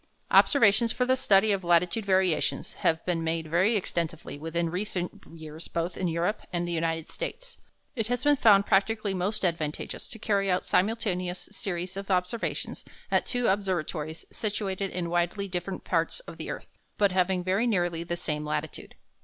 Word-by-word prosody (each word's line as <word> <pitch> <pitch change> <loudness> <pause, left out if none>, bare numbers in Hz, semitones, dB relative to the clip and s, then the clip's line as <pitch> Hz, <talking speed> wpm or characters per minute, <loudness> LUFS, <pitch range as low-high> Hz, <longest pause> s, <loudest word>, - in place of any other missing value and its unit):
Observations 230 -3 +5
for 250 - 0
the 260 +1 +3
study 215 -5 +4
of 195 -2 0
latitude 175 +5 +2
variations 185 -4 +1
have 160 0 0
been 170 -2 0
made 165 0 -1
very 180 +8 +2
extensively 170 -6 -3
within 165 +3 -2
recent 180 -1 -3
years 160 0 -9
both 170 +1 -2
in 185 - -1
Europe 170 +5 0
and 175 -1 -1
the - - -3
United 165 -1 -1
States. - - -5 0.4
It 225 -4 -1
has 245 +1 -1
been 290 0 +5
found 205 -6 +6
practically 205 +1 +2
most 195 +3 -1
advantageous 160 -4 -2
to 225 - -5
carry 200 -3 +1
out 180 0 +1
simultaneous 185 -3 0
series 185 -2 -4
of 195 0 -6
observations 185 +4 -1 0.3
at - - +2
two 245 -1 +1
observatories 175 -6 -1
situated 200 -2 -2
in 175 -2 -3
widely 175 +4 0
different 185 +1 -4
parts - - 0
of - - -11
the - - -6
earth, - - -8 0.2
but 200 -2 +3
having 185 0 +1
very 195 +6 +1
nearly 175 -6 0
the 170 +1 -3
same 150 -2 -2
latitude. 150 0 -4
185 Hz, 170 wpm, -28 LUFS, 170-205 Hz, 0.4 s, found